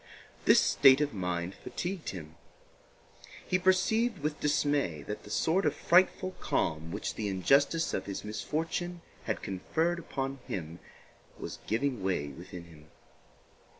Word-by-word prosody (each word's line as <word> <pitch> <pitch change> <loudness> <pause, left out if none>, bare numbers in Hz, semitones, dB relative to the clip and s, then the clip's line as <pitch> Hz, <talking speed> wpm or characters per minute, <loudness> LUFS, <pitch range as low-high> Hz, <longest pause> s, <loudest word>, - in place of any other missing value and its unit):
This - - +7
state 135 -1 +6
of 150 -1 0
mind 90 -2 -2
fatigued 175 - -5
him. 80 -5 -7 1.1
He 185 - +2
perceived 195 +5 +3
with 150 -1 -3
dismay 145 - +1
that 105 - -5
the - - -13
sort 180 +5 +2
of - - +1
frightful 185 +1 +3
calm 80 0 -1
which - - -3
the 105 - -3
injustice 140 - +2
of - - -2
his 100 - -4
misfortune 165 +10 -3 0.2
had - - -2
conferred 160 - -1
upon 135 -4 -4
him 85 -2 -5 0.6
was - - -7
giving 125 0 0
way 90 -7 -1
within 85 +4 -9
him. 80 -3 -16
135 Hz, 135 wpm, -30 LUFS, -, 1.1 s, This